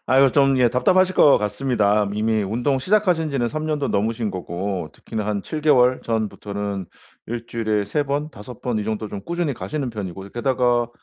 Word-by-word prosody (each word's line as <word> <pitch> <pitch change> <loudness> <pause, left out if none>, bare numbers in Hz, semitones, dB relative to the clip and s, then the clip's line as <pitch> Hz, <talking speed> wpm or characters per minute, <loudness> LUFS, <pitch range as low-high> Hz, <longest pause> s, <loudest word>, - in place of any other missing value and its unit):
아유 135 0 +5
좀 135 -1 +4
예 125 -1 +5
답답하실 185 +10 +3
것 145 - +6
같습니다. 105 -2 +1
이미 110 0 +1
운동 120 +7 0
시작하신 180 -2 +2
지는 120 -4 0
3 155 +4 -4
년도 150 -2 -1
넘으신 110 +1 0
거고. 90 -1 -4
특히나 110 -2 -5
한 105 -2 -1
7 155 - -5
개월 130 -4 +4
전부터는 100 -3 -3 0.4
일주일에 115 -3 -2
3 145 +9 0
번, 145 +2 -2
5 110 +2 -11
번 120 -3 -1
이 105 - -2
정도 110 -1 -3
좀 100 - -6
꾸준히 170 -4 -2
가시는 140 0 -4
편이고 95 -3 -6
이 100 - -13
게다가 120 -1 +1
120 Hz, 345 characters per minute, -22 LUFS, 105-140 Hz, 0.4 s, 것